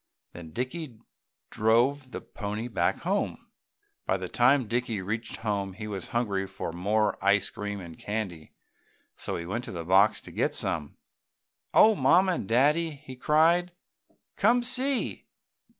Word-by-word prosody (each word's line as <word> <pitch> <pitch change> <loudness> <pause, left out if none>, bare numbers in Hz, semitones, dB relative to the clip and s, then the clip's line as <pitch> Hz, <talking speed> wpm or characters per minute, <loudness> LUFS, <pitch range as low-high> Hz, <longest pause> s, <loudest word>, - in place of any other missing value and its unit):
Then 85 -2 -9
Dicky 130 - -5 0.5
drove 125 +5 +2
the - - -6
pony 105 +2 -5
back 120 - 0
home. - - -2 0.6
By 95 - +2
the 90 -1 -5
time 125 +4 +3
Dickie 115 -2 -1
reached 110 +5 -4
home 100 -3 -2
he 105 +3 -7
was 100 -4 -5
hungry 100 -5 -1
for 85 - -6
more 105 +4 0
ice 100 0 +3
cream 105 0 -5
and 85 -3 -10
candy, 100 -7 -4 0.6
so - - -4
he 85 - -6
went 115 +7 -3
to - - -7
the 85 -2 -6
box 95 +4 +4
to - - -12
get - - -1
some. 75 -2 -1 0.7
"Oh 220 - +7
Mamma 185 +4 +4
and 170 - -3
Daddy!" 150 +7 +2
he 130 - -8
cried, 165 +6 +3 0.6
"Come 240 +4 +3
see! 255 +2 0
110 Hz, 150 wpm, -28 LUFS, 100-145 Hz, 0.7 s, Oh